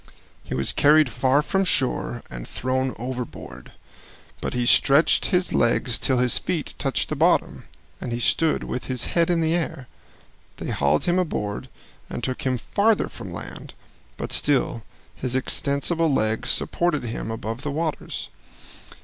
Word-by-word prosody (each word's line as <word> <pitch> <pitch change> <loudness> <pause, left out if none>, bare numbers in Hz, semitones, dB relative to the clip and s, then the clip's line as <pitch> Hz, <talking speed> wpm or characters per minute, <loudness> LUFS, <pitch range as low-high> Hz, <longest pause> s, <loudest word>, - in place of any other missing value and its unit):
He - - -5
was 65 0 +2
carried 150 -2 +4
far 130 +3 +2
from 195 +5 0
shore 130 -7 +2
and - - -9
thrown 130 +1 -2
overboard, 120 - -7 0.7
but - - -4
he 120 -1 0
stretched 140 +5 +5
his 180 -2 +1
legs 120 +1 +2
till 130 - +1
his 125 0 +2
feet 165 -6 -3
touched - - -1
bottom, - - +1 0.4
and 120 - -5
he 120 - -2
stood 160 +6 +3
with 125 - -5
his 125 -2 +2
head 170 0 +2
in 170 -1 +1
the 160 0 +1
air. 160 -6 -3 0.7
They - - -5
hauled 70 0 +1
him 175 +1 +1
aboard 105 - -3 0.4
and - - -6
took 130 -1 -3
him 130 -1 0
farther 205 - +1
from - - -9
land, - - -8 0.4
but - - -5
still 135 -5 +2 0.3
his 125 -1 -3
extensible 140 +5 +1
legs 110 -4 0
supported 170 -5 +1
him 115 -1 -4
above 115 +2 -5
the 145 - -4
waters. 155 +2 -4
130 Hz, 150 wpm, -23 LUFS, 120-160 Hz, 0.7 s, stretched